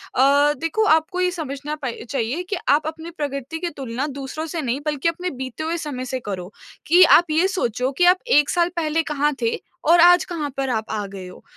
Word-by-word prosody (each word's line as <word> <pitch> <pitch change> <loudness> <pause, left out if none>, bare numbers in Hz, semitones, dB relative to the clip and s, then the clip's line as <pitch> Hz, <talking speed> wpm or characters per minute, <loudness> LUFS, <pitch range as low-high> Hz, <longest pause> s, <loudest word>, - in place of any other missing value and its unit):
अ, 285 +3 +4
देखो 330 +9 0
आपको 320 +3 0
ये 360 0 +2
समझना 295 -3 -5
प - - -1 0.2
चाहिए 270 +6 -2
कि 410 - -1
आप 300 +2 +3
अपनी 320 +1 -6
प्रगति 285 +1 -4
की 345 -1 -2
तुलना 265 +1 -3
दूसरों 280 +3 -6
से 325 +1 -4
नहीं 255 +1 -2
बल्कि 300 +2 0
अपने 360 +2 -4
बीते 260 0 -6
हुए 330 +2 -2
समय 280 -6 -5
से 255 +1 -3
करो 190 -4 -6 0.4
कि 350 +4 +7
आप 345 - +2
ये 335 +5 +3
सोचो 255 - -1
कि 355 - +4
आप 365 +1 +5 0.2
1 295 - +3
साल 350 0 +2
पहले 325 -1 0
कहाँ 295 0 +1
थे 230 -1 0 0.3
और 345 +1 +6
आज 355 +1 +7
कहाँ 315 -5 -4
पर 270 -1 -1
आप 220 -2 -1
आ 210 -2 -2
गए 195 -2 -9
हो, 180 - -13
295 Hz, 220 wpm, -22 LUFS, 260-335 Hz, 0.4 s, कि